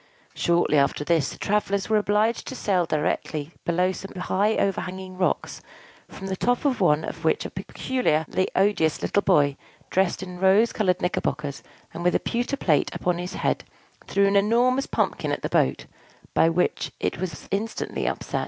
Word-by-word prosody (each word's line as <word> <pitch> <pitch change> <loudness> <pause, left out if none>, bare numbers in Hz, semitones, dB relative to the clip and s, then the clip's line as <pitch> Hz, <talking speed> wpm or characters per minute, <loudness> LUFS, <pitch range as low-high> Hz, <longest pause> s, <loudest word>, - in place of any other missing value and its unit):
Shortly 170 -3 +2
after 140 +1 +1
this, 160 -3 +1
the - - -9
travellers 200 -1 0
were 220 - +3
obliged 210 +3 +1
to 260 - -5
sail 185 -7 +1
directly 150 0 -2
below 180 +2 +2
some 195 +1 -8
high 200 +4 +1
overhanging 190 -1 -2
rocks, 185 0 -1 0.5
from 195 - -10
the 190 0 -2
top 245 +7 0
of 265 -6 +1
one 155 -3 +3
of - - -7
which - - +1
a - - -5
particularly 185 -8 -1
odious 190 -5 +2
little 200 - +2
boy, 145 -8 +3 0.3
dressed 190 0 +1
in 180 -1 -8
rose 195 +5 +4
colored 185 -4 +1
knickerbockers, 145 -5 -2 0.3
and 175 - -5
with 180 - +2
a - - +3
pewter 245 +4 -2
plate 155 - +2
upon 175 -1 -1
his 180 +1 -5
head, - - 0 0.4
threw 200 0 +3
an 200 0 +2
enormous 240 +6 +3
pumpkin - - -1
at - - -3
the - - -1
boat, - - +1 0.5
by 165 - +4
which 175 +2 0
it - - -2
was 170 -6 -5
instantly 210 +3 -2
upset. - - -2
185 Hz, 170 wpm, -25 LUFS, 170-210 Hz, 0.5 s, rose